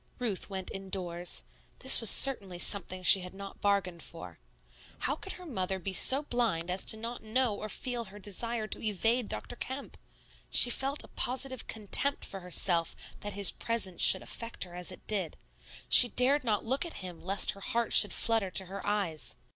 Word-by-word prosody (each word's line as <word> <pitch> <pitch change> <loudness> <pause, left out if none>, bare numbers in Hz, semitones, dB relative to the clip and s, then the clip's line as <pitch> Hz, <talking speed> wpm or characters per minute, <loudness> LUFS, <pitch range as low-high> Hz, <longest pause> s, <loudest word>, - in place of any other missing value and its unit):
Ruth 225 -7 -4
went 190 -2 -7
indoors. 180 -3 -5 0.3
This 265 -2 +6
was 225 - +7
certainly 200 -10 +6
something 185 0 +1
she 190 +2 +5
had 180 +1 -10
not 195 0 -11
bargained 195 -4 -1
for. 165 +2 -11 0.6
How - - -2
could - - -9
her 365 - -13
mother 190 - -4
be 190 +1 -6
so 270 +9 +8
blind 225 - -2
as 185 +1 +3
not 230 +2 -8
to 220 - -17
know 245 0 0
or 215 +1 -7
feel 240 +3 -4
her 200 +1 -14
desire 215 +3 -4
to - - -1
evade 225 +3 -1
Dr. 245 - -7
Kemp? 260 +3 -9 0.5
She 245 - +5
felt 275 +4 -1
a - - -14
positive 260 0 -4
contempt 225 +6 +1
for 195 - -7
herself 175 -2 +2 0.2
that 205 0 -7
his 200 -1 +4
presence 225 -6 -4
should 190 - +6
affect 230 0 -7
her 180 - -11
as 180 +1 -4
it 185 - -14
did; 195 -7 -2 0.5
she 245 - +6
dared 260 +5 0
not 215 -4 -2
look 265 +4 -2
at 340 - -8
him 175 -2 -10
lest 195 +2 +1
her 200 - -15
heart 235 +3 -3
should 205 - +6
flutter 225 -4 0
to 190 +1 -1
her 195 +2 -9
eyes. 200 -7 -4
205 Hz, 185 wpm, -29 LUFS, 185-240 Hz, 0.6 s, so